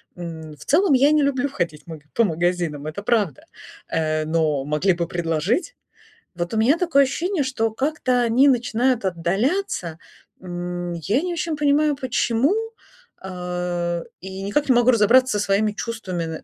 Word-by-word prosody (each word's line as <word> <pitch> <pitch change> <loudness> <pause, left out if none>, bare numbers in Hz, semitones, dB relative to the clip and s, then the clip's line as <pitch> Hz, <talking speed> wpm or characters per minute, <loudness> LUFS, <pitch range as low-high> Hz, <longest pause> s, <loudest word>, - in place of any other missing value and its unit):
М, 160 -3 -8
в 145 - -13
целом, 325 +1 +3
я 275 +3 +5
не 305 -1 +3
люблю 280 0 0
ходить 170 - -4
маг 155 -3 -9
по 230 - +3
магазинам, 170 -4 -1
это 180 +6 -6
правда. 235 +2 +3 0.7
Э, 155 -1 0
но 155 -4 0
могли 150 +6 +1
бы 170 -1 -2
предложить. 175 - -1 0.6
Вот 175 +5 -4
у - - -1
меня 260 +9 +3
такое 325 -6 +3
ощущение, 335 +4 -1
что 225 -4 -1
как-то 255 0 0
они 245 +5 +4
начинают 245 -2 +1
отдаляться. 190 - -1 0.4
М, 175 -1 -5
я 200 - 0
не 360 -1 -2
очень 330 -1 -2
понимаю, 295 0 +2
почему, 260 - +1 0.7
э, 180 -2 -3 0.2
и 190 +1 -7
никак 270 +9 -1
не - - +6
могу 240 +1 +5
разобраться 235 +1 +4
со 205 - 0
своими 210 +2 +1
чувствами 205 -6 -4
н 160 -1 -6
205 Hz, 155 wpm, -22 LUFS, 170-265 Hz, 0.7 s, не